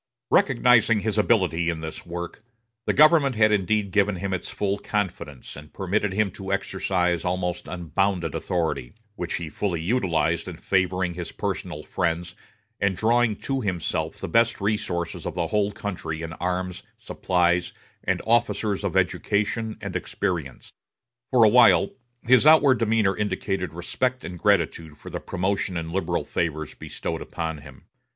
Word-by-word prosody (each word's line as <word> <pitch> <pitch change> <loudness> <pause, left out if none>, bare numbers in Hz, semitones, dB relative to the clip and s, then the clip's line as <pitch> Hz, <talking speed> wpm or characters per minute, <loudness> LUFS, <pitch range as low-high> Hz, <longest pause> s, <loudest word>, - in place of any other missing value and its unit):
Recognizing 115 -3 +4
his 110 +1 0
ability 90 -6 +2
in 80 -1 -3
this 80 +2 -7
work, 85 +5 -6 0.4
the - - +4
government 150 -3 +5
had 110 0 +4
indeed 105 0 +1
given 105 -1 +2
him 95 +2 -3
its 95 - -3
full 100 0 -1
confidence, 90 - -4
and 75 +1 -12
permitted 100 +1 -1
him 100 0 +1
to 95 +1 -7
exercise 90 -3 0
almost 90 -1 -2
unbounded 90 0 -1
authority; 85 -5 -2 0.2
which 90 -5 -3
he 85 - -4
fully 85 +2 -2
utilized 85 -5 0
in 90 -3 -7
favoring 90 -1 0
his 85 0 -6
personal - - -4
friends, 85 +1 -2 0.5
and 95 -2 +1
drawing 115 0 +3
to 135 -1 -1
himself 90 -7 -2
the - - -5
best 115 0 +2
resources 100 -5 -2
of - - -5
the 85 -2 0
whole 105 +3 +1
country 85 -6 -5
in 80 0 -5
arms, 90 +1 -3 0.2
supplies, 90 -1 0 0.3
and - - -1
officers 110 -3 +1
of - - -1
education 110 +2 0
and 100 -2 -5
experience. 85 -7 -3 0.6
For 125 -3 +5
a - - +8
while 125 - +6 0.3
his 130 +4 +5
outward 145 -5 +6
demeanor 110 -3 +2
indicated 95 -3 -2
respect 125 +10 -2
and 90 -1 -7
gratitude 80 -2 +1
for - - -11
the - - -3
promotion 95 -1 -2
and 80 0 -4
liberal 95 +2 -1
favors 80 -2 -2
bestowed - - -5
upon 80 -2 -4
him. - - -14
95 Hz, 150 wpm, -25 LUFS, 85-105 Hz, 0.6 s, a